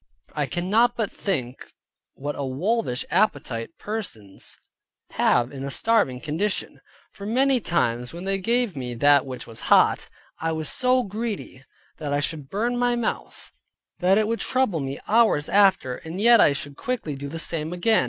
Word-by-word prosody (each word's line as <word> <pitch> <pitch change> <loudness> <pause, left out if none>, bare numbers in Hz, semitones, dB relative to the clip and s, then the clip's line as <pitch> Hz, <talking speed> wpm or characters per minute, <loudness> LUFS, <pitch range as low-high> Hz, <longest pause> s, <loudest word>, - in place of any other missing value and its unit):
I 145 -2 -1
cannot 215 - +2
but 220 -3 -1
think 130 - -3 0.4
what 145 +2 -4
a 140 - -4
wolvish 140 - -1
appetite 145 - 0
persons 180 - -6 0.5
have 120 0 +2
in 135 -1 -7
a 140 - -3
starving 170 - +2
condition; 160 +9 -3 0.3
for 200 - -8
many 260 +3 +3
times 125 - 0
when 170 +2 -8
they 195 0 -1
gave 235 -1 0
me 125 -3 -5
that 145 +2 +4
which 130 -1 -6
was 115 -1 -7
hot, - - +4 0.3
I 165 0 -1
was 160 -1 -3
so 255 0 +2
greedy, 205 - -5 0.3
that 145 -3 -3
I 145 - +2
should 145 -1 -3
burn 235 +5 -1
my 245 0 +2
mouth, 235 -2 -4 0.5
that 190 +2 +4
it 215 -1 +2
would 230 +1 -1
trouble 255 -10 +1
me 135 0 -4
hours 220 -10 +3
after, 195 -11 +3
and 160 +3 -7
yet 235 +1 +6
I - - +6
should 140 0 -6
quickly 245 -12 -3
do 140 +1 -6
the 165 - -6
same 160 -1 -2
again. 195 +5 +2
175 Hz, 170 wpm, -24 LUFS, 140-220 Hz, 0.5 s, yet